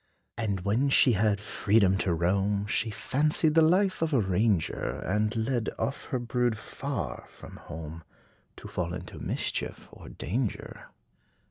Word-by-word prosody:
And 100 Hz, -5 st, -2 dB
when 110 Hz, +9 st, +1 dB
she 135 Hz, -1 st, +6 dB
had 105 Hz, -1 st, +2 dB
freedom 100 Hz, -1 st, +2 dB
to 95 Hz, -, 0 dB
roam, 100 Hz, +4 st, +1 dB
She 110 Hz, +1 st, 0 dB
fancied 150 Hz, +7 st, +2 dB
the 165 Hz, -, +6 dB
life 185 Hz, +4 st, +3 dB
of 165 Hz, -2 st, 0 dB
a -, -, +4 dB
ranger; 95 Hz, -, 0 dB
And 105 Hz, +4 st, 0 dB
led 115 Hz, 0 st, 0 dB
off 140 Hz, -, -3 dB
her 130 Hz, -, -2 dB
brood, 120 Hz, -1 st, 0 dB
far 135 Hz, +4 st, -5 dB
from -, -, -12 dB
home, 80 Hz, +1 st, -8 dB, 0.5 s
To -, -, -10 dB
fall 90 Hz, -1 st, -3 dB
into 90 Hz, 0 st, -8 dB
mischief -, -, -3 dB
or -, -, -12 dB
danger. 115 Hz, +2 st, -4 dB
110 Hz, 145 wpm, -28 LUFS, 95-130 Hz, 0.5 s, she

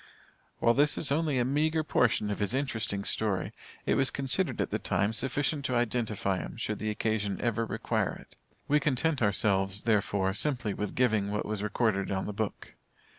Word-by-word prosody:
While 115 Hz, -, +4 dB
this 145 Hz, +3 st, +3 dB
is 140 Hz, -, +1 dB
only 150 Hz, -2 st, +1 dB
a 120 Hz, -, +2 dB
meagre 155 Hz, +4 st, +1 dB
portion 110 Hz, -7 st, +2 dB
of 105 Hz, -, -3 dB
his 105 Hz, +4 st, +1 dB
interesting 110 Hz, -7 st, -1 dB
story, 100 Hz, -3 st, -1 dB, 0.3 s
it -, -, +2 dB
was 135 Hz, 0 st, +2 dB
considered 140 Hz, +7 st, 0 dB
at -, -, -1 dB
the -, -, 0 dB
time 105 Hz, +3 st, 0 dB
sufficient 140 Hz, +4 st, -1 dB
to 130 Hz, -, 0 dB
identify 110 Hz, -5 st, 0 dB
him -, -, -7 dB
should 110 Hz, -3 st, -2 dB
the 110 Hz, -, -2 dB
occasion 105 Hz, -1 st, -1 dB
ever 115 Hz, -1 st, 0 dB
require -, -, -1 dB
it. -, -, -15 dB, 0.3 s
We 150 Hz, +1 st, +4 dB
content 150 Hz, +1 st, +1 dB
ourselves, 100 Hz, -1 st, +1 dB
therefore, 100 Hz, -3 st, +1 dB
simply 120 Hz, -2 st, 0 dB
with 105 Hz, 0 st, -4 dB
giving 110 Hz, -5 st, +2 dB
what 105 Hz, 0 st, -2 dB
was 105 Hz, -1 st, -3 dB
recorded 105 Hz, -1 st, 0 dB
on 95 Hz, -1 st, -1 dB
the 105 Hz, -, -4 dB
book. 110 Hz, -1 st, -4 dB
110 Hz, 180 wpm, -29 LUFS, 100-135 Hz, 0.3 s, While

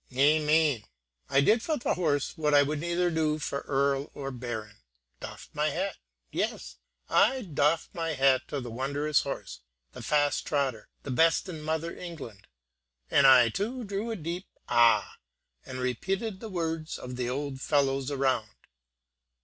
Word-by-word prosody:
Amain 150 Hz, -2 st, +3 dB, 0.5 s
I 140 Hz, -, +4 dB
did 220 Hz, +10 st, +4 dB
for 310 Hz, +4 st, -1 dB
the -, -, 0 dB
horse 150 Hz, -6 st, 0 dB
what 150 Hz, -3 st, +2 dB
I 145 Hz, -, +7 dB
would 150 Hz, +1 st, -2 dB
neither 175 Hz, +2 st, 0 dB
do 155 Hz, -2 st, +1 dB
for 140 Hz, -2 st, -3 dB
earl 140 Hz, 0 st, +1 dB
or 135 Hz, -1 st, -5 dB
baron, 115 Hz, -4 st, -6 dB, 0.4 s
doffed -, -, -9 dB
my 150 Hz, +1 st, +1 dB
hat; 185 Hz, +5 st, -2 dB, 0.4 s
yes! -, -, -3 dB, 0.3 s
I 260 Hz, -1 st, +3 dB
doffed 155 Hz, -2 st, 0 dB
my 165 Hz, -2 st, -2 dB
hat 135 Hz, -1 st, +3 dB
to 145 Hz, -, -3 dB
the 120 Hz, -3 st, -7 dB
wondrous 140 Hz, +4 st, 0 dB
horse, 65 Hz, -, -6 dB, 0.3 s
the -, -, -10 dB
fast 145 Hz, -1 st, +1 dB
trotter, 135 Hz, -6 st, -1 dB
the 140 Hz, -, -5 dB
best 165 Hz, +8 st, +3 dB
in 165 Hz, -4 st, -6 dB
mother 160 Hz, +2 st, -2 dB
England; 145 Hz, -, -9 dB, 0.6 s
and 140 Hz, -1 st, +6 dB
I 125 Hz, -3 st, +7 dB
too 225 Hz, -, -3 dB
drew 205 Hz, +2 st, -3 dB
a 225 Hz, -, -2 dB
deep 175 Hz, +1 st, -5 dB, 0.2 s
ah! 120 Hz, -1 st, +4 dB, 0.5 s
and 130 Hz, -, -6 dB
repeated 190 Hz, -, -2 dB
the 220 Hz, -, -7 dB
words 165 Hz, -3 st, -3 dB
of 125 Hz, 0 st, -7 dB
the 125 Hz, -1 st, -2 dB
old 135 Hz, 0 st, -4 dB
fellows 135 Hz, -2 st, +1 dB
around. 130 Hz, -6 st, 0 dB
145 Hz, 155 wpm, -28 LUFS, 130-165 Hz, 0.6 s, I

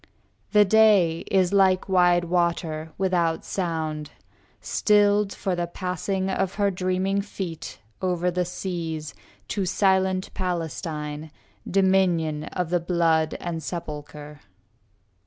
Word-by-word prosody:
The 210 Hz, -1 st, +6 dB
day 200 Hz, -6 st, +4 dB
is 190 Hz, -1 st, +2 dB
like 190 Hz, -2 st, +3 dB
wide 180 Hz, -2 st, +4 dB
water, 170 Hz, -2 st, -1 dB
without 175 Hz, -4 st, 0 dB
sound. 160 Hz, -5 st, -3 dB, 0.5 s
Stilled 205 Hz, -1 st, +2 dB
for 190 Hz, -2 st, -2 dB
the 175 Hz, 0 st, -2 dB
passing 185 Hz, +2 st, -3 dB
of 190 Hz, 0 st, -1 dB
her 200 Hz, -1 st, +1 dB
dreaming 185 Hz, +2 st, 0 dB
feet 185 Hz, -5 st, -6 dB, 0.2 s
Over 180 Hz, -1 st, 0 dB
the 180 Hz, +1 st, 0 dB
seas, 165 Hz, -4 st, -4 dB, 0.4 s
to 195 Hz, -3 st, -1 dB
silent 190 Hz, 0 st, +1 dB
Palestine, 160 Hz, -4 st, -4 dB, 0.4 s
Dominion 180 Hz, -5 st, +2 dB
of 180 Hz, -2 st, -4 dB
the 175 Hz, -, +3 dB
blood 165 Hz, -2 st, +1 dB
and 170 Hz, -2 st, -4 dB
sepulchre. 150 Hz, -3 st, -7 dB
180 Hz, 110 wpm, -25 LUFS, 165-190 Hz, 0.5 s, The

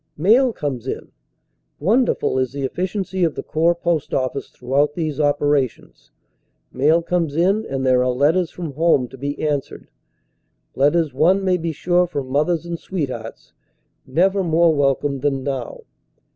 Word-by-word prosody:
Mail 230 Hz, -, +4 dB
comes 135 Hz, -, -4 dB
in -, -, -5 dB, 0.7 s
won 225 Hz, -, +3 dB
derful 130 Hz, -, 0 dB
is 130 Hz, 0 st, -1 dB
the 140 Hz, -1 st, -4 dB
efficiency 185 Hz, +5 st, -2 dB
of 165 Hz, -3 st, +1 dB
the -, -, -5 dB
Corps 165 Hz, +2 st, +1 dB
post 170 Hz, -3 st, -1 dB
office 130 Hz, +1 st, -2 dB
throughout 140 Hz, +4 st, 0 dB
these 155 Hz, -4 st, -3 dB
operations; 145 Hz, -, 0 dB, 0.6 s
mail 155 Hz, +6 st, +3 dB
comes 170 Hz, -4 st, -1 dB
in 195 Hz, +6 st, +1 dB
and 135 Hz, -1 st, -3 dB
there 125 Hz, -1 st, +4 dB
are 125 Hz, -, +1 dB
letters 155 Hz, +7 st, +2 dB
from 170 Hz, -4 st, -6 dB
home 155 Hz, -4 st, +2 dB
to 135 Hz, -, -12 dB
be 145 Hz, +2 st, -4 dB
answered, 145 Hz, -2 st, -4 dB, 0.8 s
letters 150 Hz, +2 st, +2 dB
one 185 Hz, +8 st, +3 dB
may 185 Hz, -1 st, +3 dB
be 165 Hz, -1 st, -3 dB
sure 175 Hz, +3 st, +1 dB
from 140 Hz, -6 st, -5 dB
mothers 155 Hz, +4 st, +1 dB
and 170 Hz, -1 st, -5 dB
sweethearts, 130 Hz, -11 st, -6 dB, 0.5 s
never 190 Hz, +8 st, +2 dB
more 165 Hz, -1 st, +3 dB
welcome 140 Hz, -1 st, 0 dB
than 135 Hz, -1 st, -1 dB
now. 130 Hz, -3 st, -4 dB
150 Hz, 155 wpm, -20 LUFS, 135-175 Hz, 0.8 s, Mail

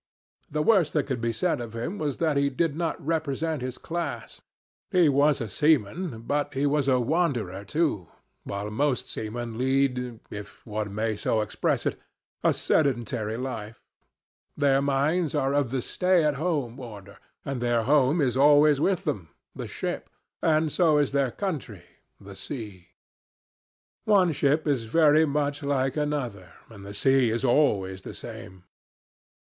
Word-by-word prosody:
The 150 Hz, +1 st, -1 dB
worst 185 Hz, -5 st, +3 dB
that 150 Hz, -, +1 dB
could 130 Hz, -4 st, -3 dB
be 115 Hz, 0 st, 0 dB
said 125 Hz, +4 st, 0 dB
of 115 Hz, -1 st, -7 dB
him 145 Hz, -, -4 dB
was 145 Hz, -4 st, -2 dB
that 160 Hz, -3 st, +1 dB
he 140 Hz, 0 st, +2 dB
did 145 Hz, +2 st, 0 dB
not 165 Hz, 0 st, -2 dB
represent 160 Hz, -1 st, -1 dB
his 130 Hz, 0 st, -4 dB
class. 160 Hz, -9 st, -5 dB, 0.5 s
He 180 Hz, -3 st, +4 dB
was 145 Hz, +1 st, +3 dB
a 115 Hz, -, -3 dB
seaman, 150 Hz, -, +1 dB
but 145 Hz, +3 st, -1 dB
he 135 Hz, +2 st, +1 dB
was 145 Hz, -1 st, +1 dB
a 130 Hz, -2 st, +4 dB
wanderer, 120 Hz, -, 0 dB
too, 105 Hz, -, -1 dB, 0.4 s
while 100 Hz, +1 st, -5 dB
most 135 Hz, +2 st, 0 dB
seamen 115 Hz, +1 st, -5 dB
lead, 125 Hz, -3 st, 0 dB
if 105 Hz, -1 st, -9 dB
one 105 Hz, -2 st, -4 dB
may 110 Hz, 0 st, -1 dB
so 110 Hz, +1 st, 0 dB
express 105 Hz, -, -1 dB
it, -, -, -1 dB, 0.4 s
a -, -, +5 dB
sedentary 120 Hz, -6 st, 0 dB
life. 115 Hz, -4 st, -6 dB, 0.7 s
Their 140 Hz, -2 st, +3 dB
minds 145 Hz, +4 st, +1 dB
are 135 Hz, +1 st, +1 dB
of 145 Hz, -4 st, +1 dB
the 130 Hz, -1 st, -2 dB
stay 180 Hz, -2 st, +2 dB
at 150 Hz, -1 st, +2 dB
home 140 Hz, -5 st, -2 dB
order, 105 Hz, -5 st, -10 dB, 0.3 s
and 135 Hz, -3 st, -3 dB
their 120 Hz, -1 st, +1 dB
home 145 Hz, +4 st, +3 dB
is 130 Hz, -3 st, +1 dB
always 145 Hz, +1 st, +5 dB
with 190 Hz, +1 st, +1 dB
them 105 Hz, -, -3 dB, 0.2 s
the -, -, -6 dB
ship; -, -, -4 dB, 0.3 s
and 155 Hz, -1 st, +2 dB
so 160 Hz, -3 st, +3 dB
is 145 Hz, -2 st, +2 dB
their 140 Hz, -2 st, +1 dB
country 130 Hz, -, -5 dB, 0.4 s
the 100 Hz, 0 st, -11 dB
sea. 105 Hz, -8 st, -8 dB, 1.2 s
One 195 Hz, -5 st, +4 dB
ship 145 Hz, +1 st, +1 dB
is 135 Hz, -6 st, 0 dB
very 155 Hz, +5 st, +4 dB
much 145 Hz, 0 st, -1 dB
like 135 Hz, -2 st, 0 dB
another, 125 Hz, -, -3 dB, 0.2 s
and 100 Hz, -3 st, -11 dB
the 100 Hz, +1 st, -8 dB
sea 135 Hz, +2 st, +3 dB
is 115 Hz, +4 st, -1 dB
always 100 Hz, -9 st, +2 dB
the -, -, -9 dB
same. 95 Hz, 0 st, -10 dB
135 Hz, 160 wpm, -26 LUFS, 115-150 Hz, 1.2 s, a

